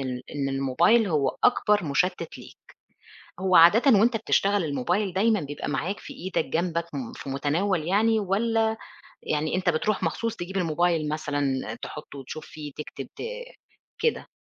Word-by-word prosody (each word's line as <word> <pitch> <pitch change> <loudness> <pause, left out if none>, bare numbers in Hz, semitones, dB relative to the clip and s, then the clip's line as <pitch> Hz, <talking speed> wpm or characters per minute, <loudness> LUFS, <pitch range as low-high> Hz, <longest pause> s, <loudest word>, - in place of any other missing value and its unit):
ال 125 -2 -4
إن 140 -2 -2
الموبايل 150 - +3
هو 145 -6 0
أكبر 210 -5 +3
مُشتِّت 170 +3 -1
ليك. - - -13 0.8
هو 185 -1 +3
عادةً 210 - +7
وأنت 230 +2 +3
بتشتغل 205 -3 +1
الموبايل 175 +8 -1
دايمًا 215 +1 +2
بيبقى 145 0 -5
معاك 170 +8 -2
في - - -10
إيدك 185 -3 -2
جنبك 170 0 -1
م 135 -4 -5
في - - -9
متناول 155 +5 0
يعني 220 +3 +3
والّا 220 +3 +1 0.5
يعني 155 +2 -1
أنت 185 -1 +1
بتروح 185 +5 0
مخصوص 230 +7 -1
تجيب 185 +2 -5
الموبايل 165 -2 +1
مثلًا 145 -6 -2
تحُطّه 145 -2 -8
وتشوف 155 +4 -8
فيه 150 -2 -9
تكتب 150 - -7
ت - - -9 0.8
كده؟ 465 - 0
175 Hz, 150 wpm, -26 LUFS, 145-205 Hz, 0.8 s, عادةً